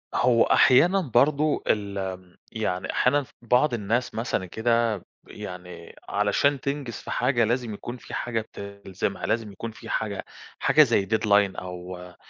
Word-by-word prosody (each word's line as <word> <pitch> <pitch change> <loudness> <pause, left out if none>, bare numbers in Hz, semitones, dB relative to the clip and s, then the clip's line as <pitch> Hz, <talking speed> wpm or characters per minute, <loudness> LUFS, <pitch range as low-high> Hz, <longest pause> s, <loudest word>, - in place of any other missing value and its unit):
هو 120 -2 +4
أحيانًا 175 +10 +5
برضه 145 +4 +3
الم 95 -3 -2
يعني 100 -5 -2
أحيانًا 145 +3 +2
ف - - -20
بعض 125 +4 +3
الناس 115 +3 -1
مثلًا 115 -4 -1
كده 115 +3 +1
ب 90 - -14 0.2
يعني 90 -1 -9
علشان 105 +8 +2
تنجِز 140 -3 -3
في - - -8
حاجة، 120 -3 +2
لازم 120 0 -1
يكون 120 +4 -7
في - - -12
حاجة 115 -2 -1
بتلزمها، 100 -2 -5
لازم 110 -2 -1
يكون 115 +4 -6
في 110 - -12
حاجة 105 -3 -2 0.3
حاجة - - +6
زي 100 - +2
deadline 105 -2 +3
أو 90 0 -7
آآ 90 0 -12
110 Hz, 150 wpm, -25 LUFS, 95-120 Hz, 0.3 s, حاجة